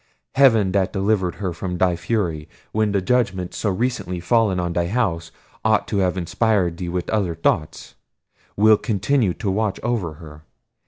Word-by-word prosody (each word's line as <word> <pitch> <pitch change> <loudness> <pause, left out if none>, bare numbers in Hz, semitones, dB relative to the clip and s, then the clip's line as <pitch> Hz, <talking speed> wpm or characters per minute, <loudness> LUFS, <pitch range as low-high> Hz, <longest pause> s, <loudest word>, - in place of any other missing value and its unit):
Heaven 115 -8 +4
that 95 0 +1
delivered 95 -2 0
her 95 -4 -3
from 90 +2 -4
thy 90 -1 +2
fury, 85 -5 -2 0.2
when 110 -1 +1
the 100 -2 0
judgments 95 -6 0
so 105 - 0
recently 100 -3 -2
fallen 105 0 +2
on 85 -1 -2
thy 85 0 0
house 85 -7 -1 0.3
ought 110 -1 +2
to 100 - 0
have 95 0 +1
inspired 90 -1 0
thee 90 -1 -4
with 90 0 -3
other 95 -6 0
thoughts, 80 -1 -1 0.6
will 110 +1 +6
continue 105 -1 0
to 100 - -2
watch 105 0 -1
over 110 -9 -1
her. 75 -1 -12
95 Hz, 165 wpm, -21 LUFS, 85-110 Hz, 0.6 s, will